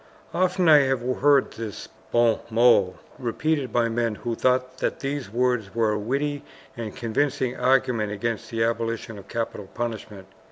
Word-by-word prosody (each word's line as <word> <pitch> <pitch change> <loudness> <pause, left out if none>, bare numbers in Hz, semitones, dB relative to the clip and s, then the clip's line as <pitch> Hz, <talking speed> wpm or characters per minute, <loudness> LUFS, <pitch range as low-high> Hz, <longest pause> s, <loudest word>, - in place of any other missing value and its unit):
Often 185 0 +1
have 135 -6 +5
I 130 - +2
heard 140 +1 +3
this 110 -3 -7 0.2
BON 120 -1 +3
MOT 110 -5 +4 0.2
repeated 140 +3 -1
by 120 -1 +2
men 115 -1 -1
who 120 +2 -4
thought 130 +1 0
that - - -1
these 140 -4 -3
words 120 -4 0
were 115 -2 +2
a 105 - -1
witty 140 +6 -2 0.3
and 115 -4 -6
convincing 125 +2 -1
argument 125 -4 +2
against 115 +2 -3
the 115 -1 0
abolition 115 -1 -2
of 100 - -14
capital 115 -3 -4
punishment. 110 -4 -5
120 Hz, 155 wpm, -25 LUFS, 115-130 Hz, 0.3 s, have